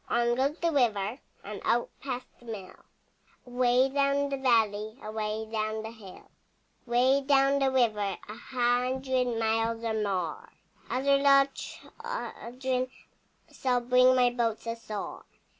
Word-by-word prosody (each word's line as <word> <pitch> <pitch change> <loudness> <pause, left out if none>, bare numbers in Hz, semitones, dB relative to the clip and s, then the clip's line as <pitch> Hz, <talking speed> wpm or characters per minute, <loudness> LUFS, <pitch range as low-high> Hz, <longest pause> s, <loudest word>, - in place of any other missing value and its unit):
On 240 0 +2
goes 275 +5 0
the 335 -1 0
river 230 -4 +1 0.2
And 205 +1 -7
out 240 0 +1
past 255 -2 -4
the 240 - -18
mill, 200 -5 -7 0.7
Away 250 +1 +3
down 280 +1 +1
the 275 - -2
valley, 220 -4 +1
Away 215 0 -3
down 220 0 -2
the 220 - -6
hill. 210 -5 -13 0.6
Away 255 +3 +3
down 275 0 +3
the 270 -1 +3
river, 215 -7 +1
A 210 - -7
hundred 250 +2 0
miles 225 +1 0
or 225 -1 -1
more, 190 -7 -2 0.4
Other 275 +3 +2
little 275 0 +6
children 260 - -5 0.6
Shall 250 -2 0
bring 250 +1 +5
my 250 -1 +4
boats 235 -2 -1
ashore. 230 -3 -5
245 Hz, 130 wpm, -29 LUFS, 220-265 Hz, 0.7 s, little